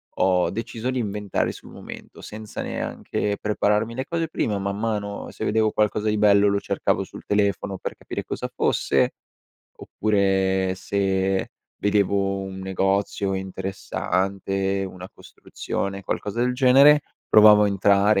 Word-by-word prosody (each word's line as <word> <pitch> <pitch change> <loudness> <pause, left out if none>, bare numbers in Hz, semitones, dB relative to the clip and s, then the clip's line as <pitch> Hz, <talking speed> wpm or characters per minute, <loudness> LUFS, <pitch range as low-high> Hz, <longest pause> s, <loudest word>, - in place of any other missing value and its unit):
ho 90 -2 +2
deciso 115 +4 -4
di 130 - -2
inventare 105 -2 -2
sul - - -13
momento, - - -11
senza 110 0 -7
neanche 105 -1 -3
prepararmi 105 +2 0
le 130 - -2
cose 165 -1 -2
prima, 105 -9 -1
man 100 0 -3
mano, 105 -2 -3
se - - -5
vedevo 110 0 +2
qualcosa 105 0 0
di 105 - 0
bello 100 -1 +5
lo 100 - +1
cercavo - - -1
sul - - -12
telefono 100 -1 0
per - - -5
capire - - -6
cosa - - -4
fosse, - - +1 0.7
oppure 95 -2 +1
se 95 0 0 0.3
vedevo 100 -1 +1
un 95 0 -7
negozio 95 +1 0
interessante, 95 0 -2
una 90 0 -10
costruzione, 100 0 -6
qualcosa 105 +3 -3
del 125 +1 +2
genere, 135 +3 +6 0.3
provavo 105 -1 +7
a - - +3
entrare, 100 +1 +3
100 Hz, 135 wpm, -23 LUFS, 95-105 Hz, 0.7 s, provavo